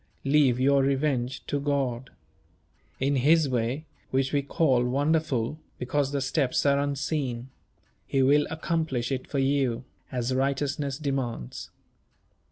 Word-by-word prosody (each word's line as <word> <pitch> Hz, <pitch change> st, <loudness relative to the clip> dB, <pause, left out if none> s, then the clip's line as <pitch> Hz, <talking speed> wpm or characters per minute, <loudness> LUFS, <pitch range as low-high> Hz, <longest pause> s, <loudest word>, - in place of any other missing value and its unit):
Leave 135 Hz, -3 st, +4 dB
your 140 Hz, +1 st, +4 dB
revenge 135 Hz, -2 st, 0 dB
to 145 Hz, -, -1 dB
God. 135 Hz, -3 st, -1 dB, 0.9 s
In 140 Hz, +1 st, +1 dB
His 155 Hz, +4 st, +4 dB
way 125 Hz, +4 st, -1 dB, 0.2 s
which 135 Hz, +1 st, 0 dB
we 145 Hz, -, +3 dB
call 135 Hz, -3 st, +2 dB
wonderful, 145 Hz, 0 st, 0 dB, 0.2 s
because 140 Hz, +2 st, -1 dB
the 140 Hz, -1 st, -1 dB
steps 135 Hz, 0 st, 0 dB
are 140 Hz, 0 st, +4 dB
unseen 140 Hz, -3 st, -2 dB, 0.6 s
He 135 Hz, -1 st, +2 dB
will 145 Hz, +2 st, +4 dB
accomplish 160 Hz, -6 st, -1 dB
it 130 Hz, -1 st, -3 dB
for 145 Hz, -, -3 dB
you, 135 Hz, -3 st, +1 dB, 0.3 s
as 125 Hz, 0 st, -1 dB
righteousness 140 Hz, +1 st, -1 dB
demands. 135 Hz, -, -3 dB
135 Hz, 125 wpm, -27 LUFS, 130-145 Hz, 0.9 s, Leave